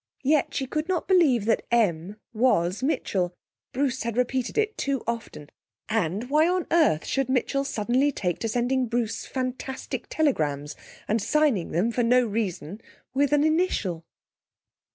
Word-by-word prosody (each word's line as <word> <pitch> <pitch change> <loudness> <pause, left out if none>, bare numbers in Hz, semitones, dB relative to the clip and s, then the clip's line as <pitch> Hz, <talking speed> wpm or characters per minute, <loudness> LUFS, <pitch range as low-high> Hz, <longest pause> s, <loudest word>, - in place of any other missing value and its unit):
Yet 290 +2 +2
she 270 - -1
could 305 +6 -3
not 360 -3 -1
believe 300 - +4
that 225 - +2
'M' 200 -5 +1 0.2
was 210 -5 +2
Mitchell. 185 - -1 0.4
Bruce 260 -1 -1
had 235 0 -3
repeated 250 - -1
it 435 0 +1
too 275 -3 -2
often; 225 -10 -5 0.4
and, 215 +1 -1
why 305 +2 +4
on 360 -1 0
earth 310 - +3
should 270 -1 -1
Mitchell 270 +2 +1
suddenly 255 +3 +1
take 180 - -2
to 225 - -2
sending 245 +2 0
Bruce 230 -1 -2
fantastic 260 0 -4
telegrams 150 - 0 0.3
and 220 +1 +1
signing 280 - +1
them, 190 +8 0
for 245 - 0
no 245 +1 +4
reason, 200 -3 -3 0.3
with 280 +1 +2
an 295 0 +4
initial?... 310 - 0
245 Hz, 150 wpm, -25 LUFS, 205-280 Hz, 0.4 s, believe